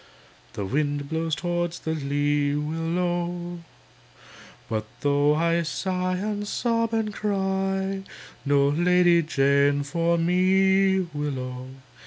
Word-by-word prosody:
The 100 - -4
wind 145 +4 -1
blows 160 0 -1
towards 175 0 -2
the 160 - -3
lee, 145 0 0
Willow! 175 +3 -2 1.1
But 110 -1 -3
though 145 +1 +3
I 170 +1 +2
sigh 185 +3 -2
and 205 +1 -3
sob 230 0 0
and 220 -2 -1
cry, 195 -1 -1 0.4
No 140 -1 +3
Lady 175 +2 +4
Jane 140 -1 +2
for 170 +4 0
me, 190 +2 +3
Willow! 130 -4 -4
170 Hz, 105 wpm, -25 LUFS, 145-190 Hz, 1.1 s, Lady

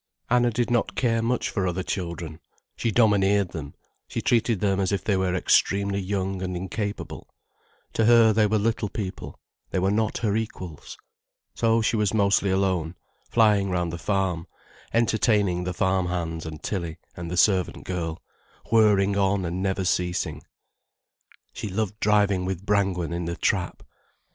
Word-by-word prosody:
Anna 120 0 +4
did 120 +1 -1
not 120 -1 +1
care 115 -2 +1
much 120 +2 -1
for 95 -4 -1
other 90 +1 -2
children. 85 -4 -4 0.4
She 115 - -1
domineered 100 -3 +3
them, 75 -4 -7 0.3
she - - -4
treated 115 -3 +1
them 100 -1 +1
as 95 0 0
if 100 - -1
they 100 - +1
were 95 -1 0
extremely 100 +2 +2
young 95 -1 -2
and 90 -1 -3
incapable, 100 +3 -5 0.6
to 110 - +2
her 115 -1 +6
they 105 0 +3
were 110 +1 +1
little 110 0 0
people, 95 -3 -6 0.3
they - - -2
were 95 +2 +2
not 110 +1 0
her 105 -3 0
equals. 95 -8 -5 0.6
So 115 -1 +2
she 115 - +1
was 105 0 +1
mostly 100 -1 +3
alone, 95 -3 0 0.3
flying 105 -4 +3
round 90 -2 -1
the 85 - -5
farm, 95 -4 -1 0.4
entertaining 105 -5 +2
the 90 - -1
farm 95 0 +1
hands 80 -2 -3
and 80 -1 -8
Tilly 85 -5 -3 0.2
and 85 -1 -6
the 90 - -3
servant 95 0 +2
girl, 85 -2 -4 0.5
whirring 105 -3 +4
on 100 -1 +1
and 85 +2 -3
never 95 -1 -1
ceasing. 90 0 -1 1.1
She 105 - -5
loved 105 +2 -2
driving 100 -3 +2
with 95 0 -4
Brangwen 95 -5 0
in 85 0 -3
the 85 0 -3
trap. 90 -4 -1
95 Hz, 160 wpm, -25 LUFS, 90-105 Hz, 1.1 s, her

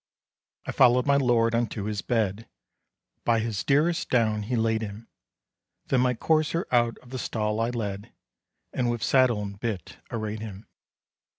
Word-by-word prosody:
I - - -3
followed 125 0 +4
my 140 -1 +4
lord 120 -4 +3
unto 115 -3 -1
his 105 0 -3
bed, 110 -2 -1 0.7
By 115 -1 +3
his 110 -2 -2
dearest 155 +5 +2
down 110 -4 +2
he 115 +5 -2
laid 110 -1 +1
him; 110 +1 -7 0.8
Then 130 - +3
my 125 -1 +2
courser 160 +5 +1
out 120 -2 +2
of 125 - -16
the 130 - -4
stall 105 -2 -2
I 115 +1 +1
led, 105 -4 -4 0.6
And 125 -2 0
with 120 -1 -2
saddle 120 -3 +3
and 100 0 -7
bit 110 -7 -4
arrayed 110 -2 -4
him. 105 -2 -8
115 Hz, 160 wpm, -26 LUFS, 105-125 Hz, 0.8 s, followed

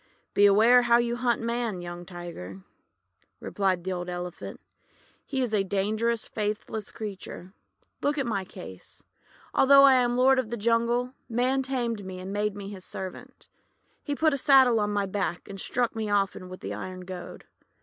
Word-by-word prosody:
"Beware 215 +5 +6
how 235 -1 +5
you 240 0 0
hunt 240 -1 0
Man, 235 -4 -2
young 175 0 -7
Tiger," 170 - -8 0.8
replied 190 -3 -1
the 190 - -3
old 175 0 -4
Elephant. 175 0 -6 0.7
;<He 265 -2 -1
is 235 -3 -3
a 205 -2 +3
dangerous, 215 +4 -1
faithless 210 0 -3
creature. 195 -4 -7 0.5
Look 290 +1 0
at 275 - 0
my 205 -5 -1
case. 95 - -11 0.5
Although 275 +1 +7
I 275 -1 +8
am 245 -1 +2
lord 260 +1 +5
of 245 -4 -2
the 235 - -3
jungle, 235 +3 +1 0.2
Man 250 +3 +1
tamed 240 -5 -2
me, 185 -1 -7
and 185 +2 -6
made 205 0 -1
me 200 -1 -7
his 195 -3 -9
servant. 190 -1 -8 0.6
He 290 - -2
put 315 +1 +3
a - - 0
saddle 260 -4 +5
on 210 0 0
my 205 -1 0
back, 190 -3 -3
and 195 -1 -7
struck 245 -2 -1
me 220 -1 -2
often 195 -2 0
with 185 - -10
an - - -4
iron 185 0 -6
goad. 180 -1 -8
210 Hz, 170 wpm, -27 LUFS, 190-240 Hz, 0.8 s, I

